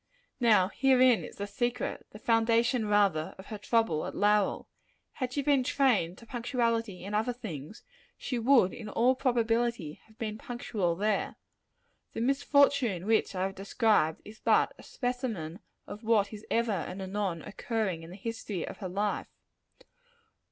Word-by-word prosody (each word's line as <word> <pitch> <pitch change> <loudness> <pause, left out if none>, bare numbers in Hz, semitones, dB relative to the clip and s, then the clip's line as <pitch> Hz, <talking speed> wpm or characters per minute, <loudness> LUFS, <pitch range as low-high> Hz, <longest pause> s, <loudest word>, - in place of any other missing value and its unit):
Now 215 -6 +4
herein 255 -6 +4
is - - -9
the 200 - -4
secret 240 +4 -3
the - - -11
foundation, 230 +1 +2
rather 200 -7 +2
of 190 - -11
her 215 -1 -7
trouble 215 -8 +1
at - - -7
Lowell. 205 -1 +2 0.4
Had 255 -2 -4
she 280 +2 -2
been 280 -3 +3
trained 240 -11 +2
to 230 - -14
punctuality 230 -5 -1
in 200 +2 -6
other 220 +4 +1
things, 210 - -8 0.3
she 250 -3 -3
would, 235 -6 +4
in 215 -2 -7
all 245 +4 +3
probability, 235 - 0
have 220 0 -23
been 215 -2 -4
punctual 215 -8 -2
there. 210 +2 0 0.8
The - - -3
misfortune 275 - +2
which 220 -2 +1
I 185 - 0
have 195 0 -2
described, 195 -4 +1
is 215 +1 -12
but - - +3
a - - -10
specimen 235 - -4 0.3
of 210 - -9
what 215 -2 +2
is 210 0 -10
ever 230 -1 +1
and 195 -1 -3
anon 190 -3 -3
occurring 210 -6 -2
in 165 - -10
the 180 - -9
history 210 -3 -5
of - - -7
her 190 -3 -5
life. 205 +3 -1
220 Hz, 160 wpm, -30 LUFS, 195-240 Hz, 0.8 s, Now